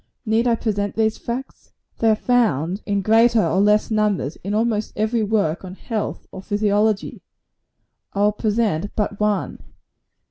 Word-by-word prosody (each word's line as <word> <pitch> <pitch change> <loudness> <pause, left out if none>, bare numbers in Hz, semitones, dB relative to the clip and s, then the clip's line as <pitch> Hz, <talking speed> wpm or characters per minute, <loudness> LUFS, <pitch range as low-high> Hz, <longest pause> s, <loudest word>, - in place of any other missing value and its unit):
Need 225 +2 +2
I 235 - +3
present 205 -3 -2
these 220 -1 0
facts? 250 +3 -7 0.3
They 225 - +3
are 215 - +4
found, 210 - +1
in 200 -1 0
greater 225 +1 +4
or 190 - +1
less 210 +2 +3
numbers, 210 -9 0
in 200 +3 -4
almost 220 -1 0
every 220 +2 0
work 200 -7 0
on 185 0 -8
health 220 0 -4
or - - -8
physiology. 205 +1 0 0.9
I 200 - -1
will 210 +1 +4
present 210 -4 -1
but 205 -1 -2
one. 210 -1 -1
210 Hz, 150 wpm, -21 LUFS, 200-225 Hz, 0.9 s, are